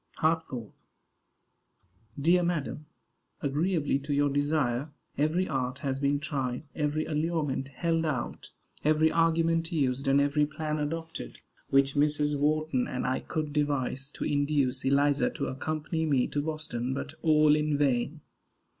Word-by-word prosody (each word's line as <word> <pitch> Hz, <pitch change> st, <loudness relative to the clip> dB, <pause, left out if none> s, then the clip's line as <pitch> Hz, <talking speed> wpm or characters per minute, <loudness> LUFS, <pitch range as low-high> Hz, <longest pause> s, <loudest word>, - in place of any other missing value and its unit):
HARTFORD. 155 Hz, -9 st, -1 dB, 1.5 s
Dear 170 Hz, +5 st, +4 dB
madam: 155 Hz, -3 st, -2 dB, 0.5 s
Agreeably 150 Hz, 0 st, 0 dB
to 140 Hz, +1 st, -2 dB
your 145 Hz, 0 st, +2 dB
desire 145 Hz, -2 st, 0 dB, 0.3 s
every 160 Hz, +6 st, +1 dB
art 130 Hz, -3 st, -2 dB
has 135 Hz, -1 st, -1 dB
been 140 Hz, 0 st, +1 dB
tried, 135 Hz, -4 st, -3 dB
every 150 Hz, 0 st, -1 dB
allurement 150 Hz, -4 st, -1 dB
held 165 Hz, +4 st, -1 dB
out, 135 Hz, -6 st, -3 dB, 0.3 s
every 155 Hz, +1 st, +4 dB
argument 165 Hz, 0 st, +2 dB
used, 135 Hz, -4 st, 0 dB
and 135 Hz, +1 st, +5 dB
every 145 Hz, +1 st, +2 dB
plan 155 Hz, 0 st, -3 dB
adopted, 160 Hz, -, -4 dB, 0.3 s
which 135 Hz, 0 st, +3 dB
Mrs. 150 Hz, 0 st, +2 dB
Wharton 150 Hz, -2 st, +1 dB
and 125 Hz, -, -3 dB
I 130 Hz, +1 st, 0 dB
could 155 Hz, -2 st, -4 dB
devise 140 Hz, -2 st, -1 dB
to -, -, -5 dB
induce 145 Hz, -3 st, +1 dB
Eliza 140 Hz, +1 st, +3 dB
to -, -, -4 dB
accompany 155 Hz, +4 st, -2 dB
me 135 Hz, -4 st, +3 dB
to 145 Hz, -, -1 dB
Boston; 145 Hz, -5 st, -3 dB
but -, -, -5 dB
all 155 Hz, -2 st, +5 dB
in 150 Hz, -1 st, +1 dB
vain. 140 Hz, +2 st, 0 dB
145 Hz, 135 wpm, -29 LUFS, 135-155 Hz, 1.5 s, and